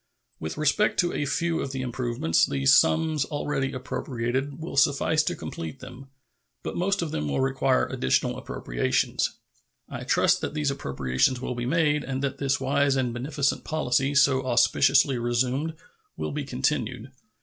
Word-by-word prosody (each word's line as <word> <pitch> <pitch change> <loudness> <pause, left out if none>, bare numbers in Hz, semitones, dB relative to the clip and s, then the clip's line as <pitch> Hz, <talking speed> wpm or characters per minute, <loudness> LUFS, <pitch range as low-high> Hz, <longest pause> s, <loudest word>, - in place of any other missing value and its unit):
With 80 - -5
respect 155 +7 +2
to 175 - -1
a 145 - -1
few 165 +3 0
of 135 - -4
the 130 -1 -3
improvements, 120 -9 0
the 70 -1 -3
sums 145 - +4
already 145 -2 -2
appropriated 130 +1 -3
will 160 -2 -6
suffice 145 +3 +3
to - - -2
complete 80 -2 -7
them; 130 +1 -11 0.6
but - - -4
most 195 +1 0
of 160 - -4
them 75 0 -2
will 70 - -1
require 130 0 +2
additional 65 - 0
appropriations. - - -1 0.5
I - - -7
trust - - +2
that - - -4
these 150 -2 0
appropriations 70 - 0
will 125 - -3
be 120 0 -4
made, 150 0 +2
and 135 0 -4
that 140 0 -2
this 140 0 0
wise 140 +1 +2
and 125 -3 0
beneficent 140 +3 -1
policy, 140 -2 0
so 140 -1 +4
auspiciously 130 +2 +3
resumed, 125 +6 -1 0.4
will - - -3
be 145 -1 -4
continued. 130 -2 -2
135 Hz, 160 wpm, -26 LUFS, 125-145 Hz, 0.6 s, sums